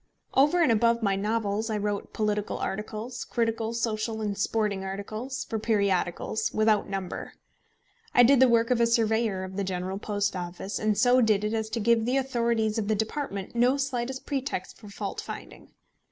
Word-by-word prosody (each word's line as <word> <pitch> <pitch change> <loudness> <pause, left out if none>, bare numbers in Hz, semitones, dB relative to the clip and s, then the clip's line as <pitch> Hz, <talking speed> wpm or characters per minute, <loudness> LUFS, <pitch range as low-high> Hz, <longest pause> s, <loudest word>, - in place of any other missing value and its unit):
Over 295 +6 +4
and 265 - +4
above 230 +1 +3
my 200 -2 +2
novels, 210 +1 -1
I 215 - 0
wrote 205 0 -2
political 210 -1 -1
articles, 215 +4 -4
critical, 225 -1 -1
social, 225 -1 -2
and 210 -2 -2
sporting 205 -1 0
articles, 215 +7 -5
for 220 - -3
periodicals, 200 -2 0
without 215 -2 +2
number. 195 -2 -5 0.8
I 245 - +6
did 265 +2 +6
the 260 -1 +6
work 230 0 +3
of 240 -1 +3
a 235 - +5
surveyor 220 -4 +1
of 190 +1 -7
the 200 - 0
General 185 +1 -3
Post 205 -2 -1
Office, 180 +2 -4
and 215 -1 +1
so 250 0 +5
did 215 -3 +3
it 210 +1 -1
as 220 -1 -1
to 230 - -2
give 225 +1 +3
the 255 +3 +1
authorities 235 -4 0
of 205 - -2
the 215 - +2
department 220 -2 -3
no 250 +3 +3
slightest 265 -1 -3
pretext 270 -9 -3
for 210 - -12
fault 200 0 -5
finding. - - -9
220 Hz, 180 wpm, -27 LUFS, 205-235 Hz, 0.8 s, I